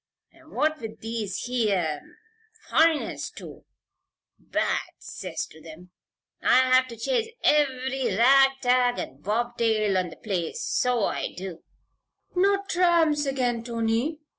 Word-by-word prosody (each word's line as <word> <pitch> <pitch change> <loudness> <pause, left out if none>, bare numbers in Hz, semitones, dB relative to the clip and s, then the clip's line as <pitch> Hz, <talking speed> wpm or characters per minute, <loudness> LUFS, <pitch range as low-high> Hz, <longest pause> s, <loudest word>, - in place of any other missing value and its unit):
An' 325 -1 -20
what 310 +1 0
with 220 -1 -8
these 225 -3 -4
here 200 -11 0 0.7
foreigners 320 -1 +2
too - - -12 0.7
bad - - -1 0.2
'cess - - -6
to 160 - -17
them! 165 +3 -13 0.5
I 255 - +5
have 255 0 +5
to 235 -2 -10
chase 465 - 0 0.2
ev'ry 265 -6 +1
rag 270 +3 +6
tag 245 0 +3
and 135 +2 -6
bobtail 220 -2 0
on 180 -1 -2
the - - -11
place, 180 -6 -3
so 245 -3 +1
I - - -2
do 180 -2 -7 0.4
" - - -42
"Not 395 +2 +2
tramps 330 -5 +2
again, 245 -4 -1
Tony?" 230 +5 -1
245 Hz, 130 wpm, -26 LUFS, 215-290 Hz, 0.7 s, rag